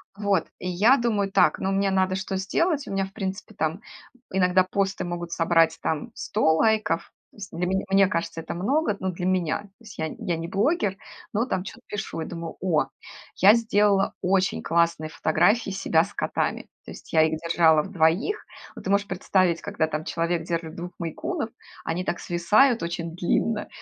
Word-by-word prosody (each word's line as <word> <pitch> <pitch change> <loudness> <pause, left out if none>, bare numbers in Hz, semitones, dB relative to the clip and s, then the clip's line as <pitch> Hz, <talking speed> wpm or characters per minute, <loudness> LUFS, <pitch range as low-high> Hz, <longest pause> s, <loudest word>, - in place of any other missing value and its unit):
Вот. 200 -1 0
И 180 - -5
я 215 +10 +5
думаю: 210 -5 0
"Так, 195 - +3
но 195 - -1
мне 195 0 +1
надо 190 0 +1
что 190 0 -3
сделать?" 290 - 0
У - - -6
меня, 195 0 0
в 190 - -13
принципе, 195 +3 -5
там 160 +4 -2 0.5
иногда 185 0 +3
посты 195 +1 -1
могут 175 -1 -5
собрать 165 -1 +3
там 160 +9 -2
100 160 -7 +1
лайков, 215 -3 +1 0.2
с 205 -2 -8
для 175 +2 -2
меня, 190 +1 0
мне 195 0 +5
кажется, 170 -2 -3
это 160 - -6
много, 210 - 0
ну, 190 - -1
для 175 +1 -5
меня. 185 -1 0
То 205 - -16
есть 215 -2 -12
я 160 - -1
я 170 -2 -2
не 165 +1 -5
блогер, 200 - +1 0.4
но 225 +4 +1
там 185 -8 -2
чё-то 230 +5 -10
пишу 195 -5 -4
и - - -3
думаю: 165 -1 -6
"О, 170 -5 +2 0.5
я 200 +3 +7
сделала 210 -3 +2
очень 190 +1 +1
классные 170 -2 +1
фотографии 195 +9 +2
себя 165 -4 +2
с 200 - -9
котами". - - -1 0.2
То - - -9
есть - - -12
я 160 - +6
их 160 0 +1
держала 160 -2 +3
в 195 - -9
2. 180 - +1 0.3
Вот - - -10
ты - - -2
можешь 200 0 +2
представить, 185 -2 +1
когда 200 -6 -1
там 155 0 -3
человек 170 0 -1
держит 165 -1 -3
2 175 +1 -6
мейн-кунов, 225 - -3 0.4
они 170 +3 -2
так 175 - -2
свисают 215 +9 +3
очень 170 0 -4
длинно, 210 +5 0
185 Hz, 190 wpm, -25 LUFS, 170-205 Hz, 0.5 s, я